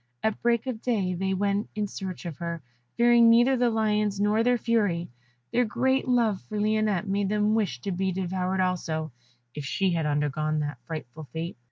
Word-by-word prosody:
At 220 -1 0
break 235 0 +2
of 245 -4 -4
day 200 -7 0
they 190 +2 -1
went 200 +2 0
in 210 -1 0
search 190 -2 -6
of 165 -5 -5
her, 170 -2 -5 0.3
fearing 235 -1 +6
neither 240 +3 +5
the 245 -1 +2
lions 210 -2 0
nor 210 +2 +2
their 245 +1 +3
fury; 205 - 0 0.4
their 245 - +3
great 260 +4 0
love 230 -6 +2
for 215 -1 -5
Lionette 215 -2 +1
made 195 0 0
them 210 +1 +2
wish 195 - 0
to 195 - -3
be 190 +1 -1
devoured 185 +1 -1
also, 160 -4 -1 0.4
if 150 - -6
she 190 +6 0
had 165 -3 0
undergone 150 +1 0
that 145 0 -4
frightful 155 -2 -7
fate. 165 +2 -4
200 Hz, 185 wpm, -27 LUFS, 170-220 Hz, 0.4 s, fearing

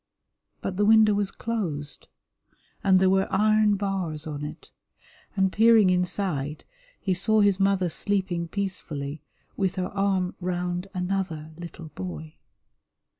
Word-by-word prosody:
But 185 - -4
the 205 - +3
window 220 -1 +6
was 200 -1 0
closed, 170 -13 -4 0.8
and 190 -1 +5
there 190 - +4
were 190 0 +2
iron 215 +1 +4
bars 190 -6 -3
on 150 -2 -5
it, 150 - -8 0.6
and 190 -1 +2
peering 220 -3 +5
inside 180 -5 -1 0.4
he 190 - 0
saw 215 +4 +3
his 200 -2 +3
mother 195 -2 +2
sleeping 180 -1 -1
peacefully 155 -7 -4 0.3
with 190 -2 0
her 185 -1 -2
arm 195 -2 0
round 180 0 -2
another 180 -4 -2
little 170 -1 -9
boy. 80 - -7
185 Hz, 125 wpm, -26 LUFS, 165-200 Hz, 0.8 s, window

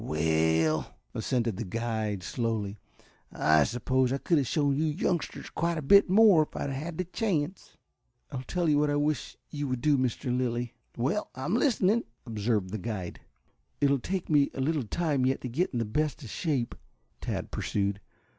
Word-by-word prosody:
"Well," 80 0 +1 0.2
assented 115 -5 -1
the - - -2
guide 110 -2 -2
slowly, 105 +2 -2 0.5
"I 80 -1 +4
suppose 125 +2 +1
I 135 - +1
could 165 +3 +2
have 135 - -1
shown 145 -1 +1
you 155 +3 +1
youngsters 170 +2 -2
quite 170 0 -1
a 155 - -3
bit 200 +7 +6
more 200 -4 +7
if 155 - -3
I - - -3
had 140 - -2
had 155 +5 -5
the 185 - 0
chance." 180 -3 -2 0.5
"I'll 130 - -4
tell 175 +6 -1
you 150 -1 +4
what 150 0 +2
I 145 - +1
wish 145 0 -1
you 145 -1 -3
would 130 -2 -2
do, 145 -1 +3
Mr. 125 0 -1
Lilly." 120 -1 -1 0.2
"Well, 135 - 0
I'm 135 +8 -2
listening," 230 -3 +2 0.2
observed 105 -4 -1
the 110 - -3
guide. 95 -3 -5 0.6
"It 140 -1 +3
will 140 - +2
take 185 +7 -3
me 145 -3 +4
a - - -5
little 140 -3 0
time 150 -1 0
yet 130 +1 +1
to - - -4
get 165 +10 0
in 125 - -4
the 115 - 0
best 150 +7 -1
of 115 - -8
shape," 140 -9 -1 0.5
Tad - - -4
pursued. 100 0 -1
130 Hz, 185 wpm, -29 LUFS, 115-155 Hz, 0.6 s, more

